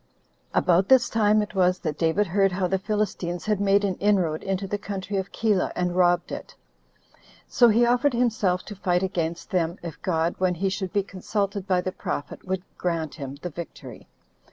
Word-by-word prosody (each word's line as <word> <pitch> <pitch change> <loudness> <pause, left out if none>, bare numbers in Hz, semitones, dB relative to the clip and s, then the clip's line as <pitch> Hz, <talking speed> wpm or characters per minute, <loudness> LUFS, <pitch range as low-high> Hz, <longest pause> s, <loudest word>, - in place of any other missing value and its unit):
1. - - +2
About 180 +2 +3
this 260 -2 +5
time 215 -1 +3
it 210 - -8
was 185 -1 +3
that 150 - -3
David 165 +6 +1
heard 195 +1 +2
how 185 0 0
the 190 +1 0
Philistines 190 -4 -2
had 210 -2 0
made 200 0 +3
an 195 -2 +1
inroad 185 -6 +1
into 195 0 -2
the 205 +2 -3
country 200 -1 -4
of 190 0 -3
Keilah, 210 -5 +1
and 180 0 -1
robbed 175 -1 +3
it; - - -7 0.9
so 240 - +5
he 230 +2 +4
offered 245 +3 +2
himself 220 -7 +1
to 210 - -8
fight 180 -1 0
against 170 -1 -3
them, 175 -1 0
if 165 -2 -7
God, 170 -3 0
when 185 -1 +2
he 190 +3 0
should 190 -1 -3
be 200 +2 +1
consulted 200 +1 -3
by 185 -2 +2
the 185 - -3
prophet, 145 -5 -5
would 185 -1 -2 0.2
grant 165 -4 -1
him 140 -3 -7
the 180 - -4
victory. 170 +1 -9
190 Hz, 195 wpm, -25 LUFS, 175-205 Hz, 0.9 s, this